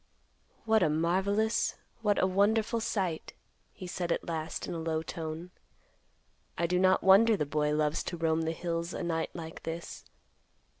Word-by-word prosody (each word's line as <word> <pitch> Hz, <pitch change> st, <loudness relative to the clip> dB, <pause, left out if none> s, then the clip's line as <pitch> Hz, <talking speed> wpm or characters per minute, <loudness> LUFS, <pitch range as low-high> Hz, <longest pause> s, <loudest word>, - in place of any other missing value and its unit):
"What 220 Hz, -1 st, +4 dB
a -, -, +4 dB
marvelous, 190 Hz, +8 st, +1 dB, 0.3 s
what 210 Hz, -2 st, +2 dB
a -, -, +3 dB
wonderful 215 Hz, +4 st, +2 dB
sight!" 190 Hz, -7 st, -2 dB, 0.4 s
he 185 Hz, -, -9 dB
said 175 Hz, -1 st, -3 dB
at -, -, -1 dB
last 160 Hz, -1 st, -3 dB
in 180 Hz, -, -4 dB
a 165 Hz, -, -3 dB
low 160 Hz, -1 st, -1 dB
tone. 165 Hz, +2 st, -6 dB, 1.1 s
"I 170 Hz, -, +1 dB
do 180 Hz, +1 st, +1 dB
not 185 Hz, 0 st, +4 dB
wonder 210 Hz, +3 st, +6 dB
the 150 Hz, -, 0 dB
boy 150 Hz, +1 st, 0 dB
loves 150 Hz, 0 st, +1 dB
to 175 Hz, -, -4 dB
roam 165 Hz, 0 st, +1 dB
the 160 Hz, 0 st, -1 dB
hills 170 Hz, 0 st, -3 dB
a -, -, -3 dB
night 165 Hz, -1 st, -1 dB
like 165 Hz, -1 st, -7 dB
this. 165 Hz, +1 st, -6 dB
170 Hz, 165 wpm, -30 LUFS, 160-195 Hz, 1.1 s, wonder